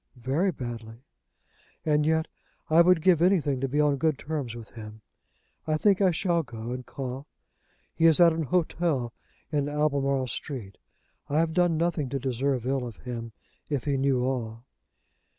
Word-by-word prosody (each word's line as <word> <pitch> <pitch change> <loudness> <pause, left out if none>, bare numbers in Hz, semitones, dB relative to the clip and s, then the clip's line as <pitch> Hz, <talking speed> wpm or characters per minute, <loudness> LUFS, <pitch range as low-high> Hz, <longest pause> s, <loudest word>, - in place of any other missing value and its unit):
"Very 135 +10 0
badly." 115 -4 -7 0.8
"And 150 -1 +2
yet 160 0 +2 0.4
I 165 +2 +7
would 175 -2 +4
give 180 -4 +4
anything 160 -8 +2
to 135 - 0
be 145 +3 -1
on 145 -2 +3
good 155 0 +1
terms 140 -7 -4
with 115 -2 -10
him. 110 -1 -10 0.6
I 155 0 +1
think 200 +3 +3
I 190 - +5
shall 170 0 +1
go 120 -4 -7
and 125 0 -4
call. 135 +2 -6 0.7
He 165 0 +4
is 160 0 +5
at 170 -2 +7
an 160 -1 -2
hotel 155 -5 0 0.4
in 145 -2 0
Albemarle 140 -3 +1
Street. 115 -5 -6 0.5
I 145 - 0
have 160 0 +2
done 175 -2 +2
nothing 165 -4 0
to 135 - -2
deserve 130 -1 -1
ill 130 -1 -1
of 115 - -10
him, 115 -2 -6 0.4
if 145 -5 -1
he 140 -2 0
knew 135 -2 +1
all." 120 -3 -3
140 Hz, 170 wpm, -27 LUFS, 125-160 Hz, 0.8 s, I